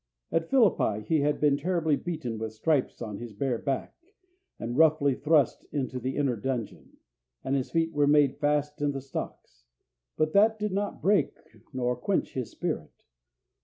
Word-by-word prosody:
At 165 Hz, 0 st, 0 dB
Philippi 195 Hz, -, +3 dB
he 155 Hz, +7 st, +2 dB
had 145 Hz, +1 st, +1 dB
been 145 Hz, -2 st, +3 dB
terribly 160 Hz, -1 st, +1 dB
beaten 125 Hz, -10 st, -4 dB
with 110 Hz, 0 st, -4 dB
stripes 135 Hz, +2 st, 0 dB
on 105 Hz, -3 st, -6 dB
his 120 Hz, -2 st, -8 dB
bare 120 Hz, +2 st, -1 dB
back, 135 Hz, -2 st, -2 dB, 0.6 s
and 120 Hz, +1 st, -4 dB
roughly 150 Hz, -2 st, +4 dB
thrust 145 Hz, 0 st, +2 dB
into 130 Hz, -3 st, -2 dB
the 130 Hz, +2 st, -3 dB
inner 140 Hz, -4 st, +1 dB
dungeon, 120 Hz, 0 st, -5 dB, 0.5 s
and 135 Hz, -, 0 dB
his 130 Hz, -2 st, -1 dB
feet 165 Hz, 0 st, 0 dB
were 145 Hz, -1 st, +3 dB
made 145 Hz, -2 st, +4 dB
fast 150 Hz, 0 st, 0 dB
in 145 Hz, -1 st, +1 dB
the 135 Hz, -, -3 dB
stocks; -, -, -7 dB, 0.5 s
but 155 Hz, 0 st, +1 dB
that 220 Hz, +2 st, +5 dB
did 210 Hz, -1 st, -2 dB
not 200 Hz, -3 st, -3 dB
break 200 Hz, +2 st, +2 dB, 0.3 s
nor 125 Hz, -1 st, -1 dB
quench 185 Hz, +11 st, -1 dB
his 125 Hz, -4 st, -3 dB
spirit. -, -, -5 dB
145 Hz, 165 wpm, -28 LUFS, 125-160 Hz, 0.6 s, that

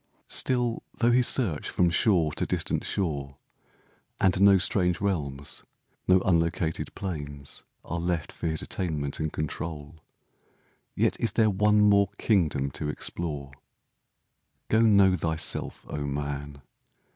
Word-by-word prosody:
Still, 120 Hz, -2 st, +1 dB, 0.2 s
though 120 Hz, 0 st, +3 dB
he 125 Hz, +1 st, +4 dB
search 115 Hz, -, +2 dB
from 90 Hz, -1 st, +2 dB
shore 90 Hz, -5 st, +3 dB
to -, -, -2 dB
distant -, -, -1 dB
shore, 70 Hz, -7 st, -3 dB, 0.8 s
And 95 Hz, 0 st, +2 dB
no 100 Hz, -1 st, +7 dB
strange 90 Hz, -2 st, +2 dB
realms, 70 Hz, -8 st, -3 dB, 0.4 s
no 95 Hz, 0 st, +5 dB
unlocated 85 Hz, -2 st, 0 dB
plains 75 Hz, -7 st, -6 dB, 0.2 s
Are 85 Hz, -, -4 dB
left 85 Hz, -2 st, -2 dB
for 85 Hz, -, -5 dB
his 80 Hz, -1 st, -2 dB
attainment 75 Hz, -6 st, -3 dB
and 80 Hz, -1 st, -2 dB
control, 75 Hz, 0 st, -5 dB, 0.9 s
Yet -, -, +1 dB
is 115 Hz, -, 0 dB
there 110 Hz, -2 st, +3 dB
one 105 Hz, +2 st, +3 dB
more 100 Hz, -2 st, +4 dB
kingdom 80 Hz, -, +1 dB
to 75 Hz, +3 st, -4 dB
explore. 75 Hz, -3 st, -4 dB, 1.2 s
Go, 110 Hz, -, +3 dB
know 100 Hz, -4 st, +5 dB
thyself, 80 Hz, -1 st, -2 dB
O 75 Hz, -, -4 dB
man! 70 Hz, 0 st, -5 dB
85 Hz, 125 wpm, -27 LUFS, 75-100 Hz, 1.2 s, no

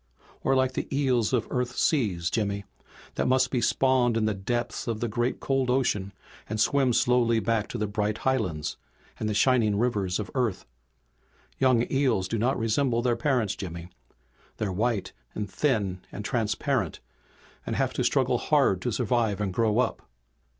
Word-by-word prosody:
"Or 135 Hz, -, +2 dB
like 130 Hz, 0 st, +2 dB
the -, -, -3 dB
eel 135 Hz, -3 st, +2 dB
of 125 Hz, -4 st, +1 dB
Earth's 125 Hz, -1 st, -2 dB
seas, 100 Hz, -, +1 dB
Jimmy, 100 Hz, -2 st, -1 dB, 0.5 s
that -, -, -1 dB
must 130 Hz, 0 st, +3 dB
be 125 Hz, -, 0 dB
spawned 125 Hz, -1 st, +2 dB
in 110 Hz, -, +1 dB
the 110 Hz, -, +1 dB
depths 120 Hz, +7 st, -3 dB
of 115 Hz, -2 st, -2 dB
the 120 Hz, -, -1 dB
great 120 Hz, +3 st, -1 dB
cold 135 Hz, -2 st, 0 dB
ocean, 110 Hz, -7 st, +1 dB, 0.4 s
and 110 Hz, 0 st, -3 dB
swim 135 Hz, +2 st, +3 dB
slowly 120 Hz, -1 st, +3 dB
back 110 Hz, -2 st, 0 dB
to -, -, -5 dB
the 105 Hz, -, -1 dB
bright 105 Hz, +1 st, -1 dB
highlands 110 Hz, -13 st, -1 dB, 0.4 s
and 110 Hz, -, -1 dB
the 105 Hz, -, -1 dB
shining 110 Hz, -4 st, +3 dB
rivers 100 Hz, -6 st, 0 dB
of 105 Hz, -, -5 dB
Earth. 120 Hz, -7 st, -1 dB, 0.9 s
Young 130 Hz, -3 st, +4 dB
eels 130 Hz, -9 st, +1 dB
do 115 Hz, +3 st, -2 dB
not 125 Hz, +5 st, +1 dB
resemble 120 Hz, +1 st, +1 dB
their 120 Hz, -2 st, +2 dB
parents, 120 Hz, -5 st, 0 dB
Jimmy. 85 Hz, -2 st, -7 dB, 0.7 s
They're 105 Hz, -3 st, -2 dB
white 110 Hz, +2 st, -1 dB, 0.2 s
and 105 Hz, -1 st, -3 dB
thin 100 Hz, -4 st, 0 dB
and 105 Hz, -, -7 dB
transparent 110 Hz, -3 st, -1 dB, 0.6 s
and -, -, -3 dB
have -, -, 0 dB
to -, -, -1 dB
struggle -, -, +2 dB
hard -, -, +2 dB
to -, -, -1 dB
survive 115 Hz, -5 st, 0 dB
and 100 Hz, -3 st, -2 dB
grow 110 Hz, +1 st, +1 dB
up. 125 Hz, -, -1 dB
115 Hz, 170 wpm, -27 LUFS, 105-125 Hz, 0.9 s, Young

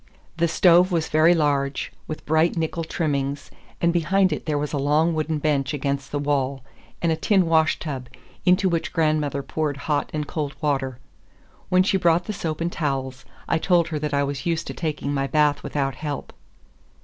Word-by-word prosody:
The 170 Hz, 0 st, +2 dB
stove 175 Hz, +2 st, +5 dB
was 165 Hz, -2 st, 0 dB
very 160 Hz, +3 st, +5 dB
large, 140 Hz, -3 st, 0 dB
with 155 Hz, -, -6 dB
bright 160 Hz, +3 st, +2 dB
nickel 165 Hz, +1 st, -1 dB
trimmings, 140 Hz, -3 st, -2 dB, 0.3 s
and 170 Hz, 0 st, +2 dB
behind 185 Hz, +2 st, +2 dB
it 150 Hz, -, -6 dB
there 150 Hz, -1 st, +1 dB
was 150 Hz, +1 st, -3 dB
a 145 Hz, -, 0 dB
long 150 Hz, +4 st, +2 dB
wooden 155 Hz, 0 st, -1 dB
bench 145 Hz, -2 st, 0 dB
against 140 Hz, 0 st, -3 dB
the 145 Hz, -, -1 dB
wall, 140 Hz, -2 st, -1 dB, 0.4 s
and 170 Hz, -, +3 dB
a -, -, +2 dB
tin 190 Hz, +3 st, +2 dB
washtub, 155 Hz, -5 st, 0 dB, 0.3 s
into 185 Hz, +1 st, +4 dB
which 170 Hz, -2 st, -1 dB
grandmother 155 Hz, -3 st, +1 dB
poured 150 Hz, -2 st, -2 dB
hot 150 Hz, -2 st, 0 dB
and 150 Hz, -1 st, -2 dB
cold 145 Hz, -2 st, -4 dB
water. 135 Hz, -4 st, -1 dB, 0.7 s
When 185 Hz, 0 st, +4 dB
she 195 Hz, +1 st, +2 dB
brought 175 Hz, -1 st, +3 dB
the 215 Hz, -, -3 dB
soap 165 Hz, -4 st, -4 dB
and 170 Hz, +1 st, -1 dB
towels, 135 Hz, -5 st, -3 dB, 0.2 s
I 165 Hz, -, +1 dB
told 175 Hz, -1 st, +2 dB
her 155 Hz, -3 st, -2 dB
that 150 Hz, 0 st, -2 dB
I 140 Hz, -, +2 dB
was 140 Hz, -1 st, -3 dB
used 165 Hz, -1 st, 0 dB
to -, -, -5 dB
taking 150 Hz, -3 st, -3 dB
my 135 Hz, -1 st, 0 dB
bath 150 Hz, -1 st, +2 dB
without 135 Hz, -2 st, -2 dB
help. 145 Hz, +1 st, -5 dB
155 Hz, 185 wpm, -23 LUFS, 140-165 Hz, 0.7 s, stove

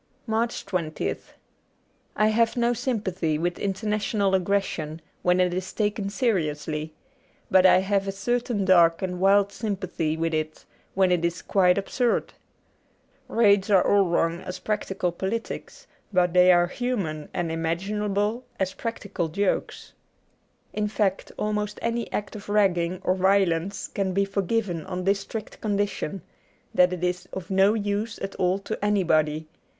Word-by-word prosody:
85 -, -, -14 dB
MARCH 230 Hz, +2 st, -1 dB
20th 175 Hz, -5 st, -2 dB, 0.9 s
I 215 Hz, -, +3 dB
HAVE 230 Hz, +2 st, +2 dB
no 240 Hz, 0 st, +2 dB
sympathy 205 Hz, -, -1 dB
with 175 Hz, +2 st, -2 dB
international 205 Hz, 0 st, 0 dB
aggres 195 Hz, +1 st, +2 dB
sion 155 Hz, -3 st, -5 dB, 0.2 s
when 180 Hz, +1 st, +3 dB
it 180 Hz, -1 st, +2 dB
is 185 Hz, +1 st, -3 dB
taken 205 Hz, -2 st, -1 dB
seriously, 155 Hz, -8 st, -1 dB, 0.6 s
but 190 Hz, -1 st, +7 dB
I 185 Hz, -, +6 dB
have 195 Hz, 0 st, 0 dB
a -, -, 0 dB
certain 235 Hz, +1 st, -1 dB
dark 170 Hz, -2 st, +5 dB
and 180 Hz, -1 st, -3 dB
wild 200 Hz, +1 st, +4 dB
sympathy 185 Hz, -7 st, -2 dB
with 165 Hz, 0 st, -1 dB
it 155 Hz, 0 st, -3 dB, 0.3 s
when 190 Hz, -1 st, +3 dB
it 175 Hz, -2 st, +2 dB
is 170 Hz, +1 st, -1 dB
quite 180 Hz, -2 st, +3 dB
absurd. 235 Hz, +4 st, 0 dB, 0.9 s
Raids 205 Hz, -3 st, +3 dB
are 195 Hz, -3 st, +5 dB
all 200 Hz, -1 st, +4 dB
wrong 170 Hz, 0 st, +1 dB
as 185 Hz, 0 st, -6 dB
practical 195 Hz, -4 st, -2 dB
politics, 225 Hz, -, -5 dB, 0.3 s
but 180 Hz, -3 st, +2 dB
they 180 Hz, 0 st, +7 dB
are 175 Hz, -1 st, +5 dB
human 180 Hz, -, -3 dB
and 170 Hz, -2 st, -2 dB
imaginable 200 Hz, +7 st, -1 dB, 0.2 s
as 190 Hz, -1 st, 0 dB
practical 200 Hz, -7 st, -4 dB
jokes. 195 Hz, +5 st, -2 dB, 0.8 s
In 210 Hz, 0 st, 0 dB
fact, 205 Hz, -2 st, -1 dB
almost 210 Hz, 0 st, -2 dB
any 230 Hz, 0 st, -2 dB
act 205 Hz, +1 st, -3 dB
of 205 Hz, -1 st, -9 dB
ragging 185 Hz, -4 st, +2 dB
or 185 Hz, -, +2 dB
violence 190 Hz, -1 st, +1 dB
can 190 Hz, -2 st, -2 dB
be 200 Hz, +1 st, +2 dB
forgiven 195 Hz, -3 st, -1 dB
on 185 Hz, -1 st, -4 dB
this 200 Hz, +2 st, +2 dB
strict 215 Hz, +2 st, -7 dB
condition 205 Hz, -3 st, -2 dB, 0.2 s
— -, -, -38 dB
that 180 Hz, 0 st, +5 dB
it 180 Hz, -1 st, -4 dB
is 180 Hz, 0 st, -1 dB
of 190 Hz, -1 st, -6 dB
no 195 Hz, +3 st, +4 dB
use 205 Hz, +1 st, -2 dB
at 195 Hz, 0 st, -5 dB
all 185 Hz, +1 st, +2 dB
to 200 Hz, +1 st, -6 dB
anybody. 155 Hz, -6 st, +1 dB
195 Hz, 150 wpm, -25 LUFS, 180-210 Hz, 0.9 s, but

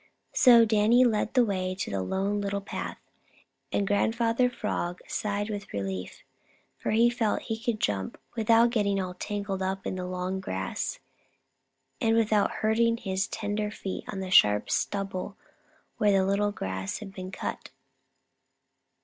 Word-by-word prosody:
So 235 Hz, -3 st, +7 dB
Danny 220 Hz, +3 st, +4 dB
led 220 Hz, 0 st, 0 dB
the 250 Hz, -2 st, +5 dB
way 185 Hz, -3 st, -2 dB
to 190 Hz, -, -4 dB
the 100 Hz, -1 st, -1 dB
Lone 195 Hz, -, -1 dB
Little 200 Hz, 0 st, -1 dB
Path, 200 Hz, -, -5 dB, 0.7 s
and 200 Hz, -, +1 dB
Grandfather 230 Hz, +4 st, +2 dB
Frog 180 Hz, -7 st, -3 dB
sighed 205 Hz, 0 st, -2 dB
with 205 Hz, -1 st, -6 dB
relief, 95 Hz, -2 st, -5 dB, 0.6 s
for -, -, -3 dB
here 230 Hz, 0 st, +3 dB
he 225 Hz, -, -3 dB
could 235 Hz, -4 st, -1 dB
jump 95 Hz, -, -1 dB, 0.2 s
without 230 Hz, +1 st, +4 dB
getting 200 Hz, -4 st, +1 dB
all 185 Hz, -1 st, -3 dB
tangled 200 Hz, 0 st, -4 dB
up 190 Hz, 0 st, -2 dB
in 185 Hz, -, -3 dB
long 185 Hz, +1 st, -3 dB
grass 95 Hz, -, -3 dB, 1.0 s
and 225 Hz, 0 st, +3 dB
without 215 Hz, -2 st, +3 dB
hurting 230 Hz, +1 st, +1 dB
his 190 Hz, -3 st, -2 dB
tender 210 Hz, 0 st, -2 dB
feet 195 Hz, -2 st, -5 dB
on 190 Hz, -1 st, -4 dB
sharp 105 Hz, -, +5 dB
stubble 195 Hz, -1 st, -2 dB, 0.6 s
where 210 Hz, -1 st, +3 dB
the 200 Hz, +1 st, +2 dB
grass 95 Hz, -, -4 dB
had 195 Hz, -3 st, -9 dB
been 185 Hz, -1 st, -7 dB
cut. 190 Hz, -, -5 dB
205 Hz, 140 wpm, -28 LUFS, 185-220 Hz, 1.0 s, So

